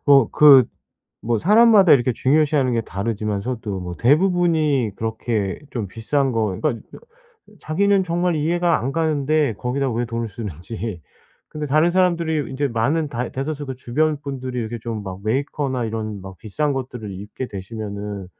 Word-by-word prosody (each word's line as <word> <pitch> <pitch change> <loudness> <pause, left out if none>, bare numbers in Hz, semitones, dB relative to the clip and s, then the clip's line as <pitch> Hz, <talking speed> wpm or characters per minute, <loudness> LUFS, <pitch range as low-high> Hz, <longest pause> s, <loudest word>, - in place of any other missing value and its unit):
어 135 -5 +6
그 140 -5 +7 0.6
뭐 115 -1 +1
사람마다 210 - +6
이렇게 125 -3 +4
중요시하는 140 0 +2
게 115 - +1
다르지만서도 105 +1 -3
뭐 90 -1 -6
대부분이 155 - +2
그렇게 110 -2 -2
좀 115 -7 -3
비싼 130 +7 -1
거 115 -2 +1
그러니까 100 +11 -1
어 465 - -14
자기는 195 +5 +2
정말 175 0 0
이해가 170 +3 +1
안 130 - -2
가는데 155 -3 +1
거기다 130 +5 -2
왜 120 +2 -1
돈을 115 -1 -3
쓰는지. 100 0 -6 0.5
근데 150 -1 -5
다른 155 +5 +3
사람들이 170 -5 +1
인제 140 +1 -1
많은 140 +7 0
다 120 -4 -3
대다수 145 +2 -4
그 130 -1 -5
주변 150 +4 0
분들이 130 -3 -5
이렇게 115 0 -4
좀 110 -2 -5
막 95 -1 -7
메이커나 130 +2 -1
이런 110 -2 -4
막 95 0 -10
비싼 145 - -2
것들을 125 -6 -5
입게 105 +7 -6
되시면은 100 -1 -6
130 Hz, 340 characters per minute, -21 LUFS, 110-155 Hz, 0.6 s, 그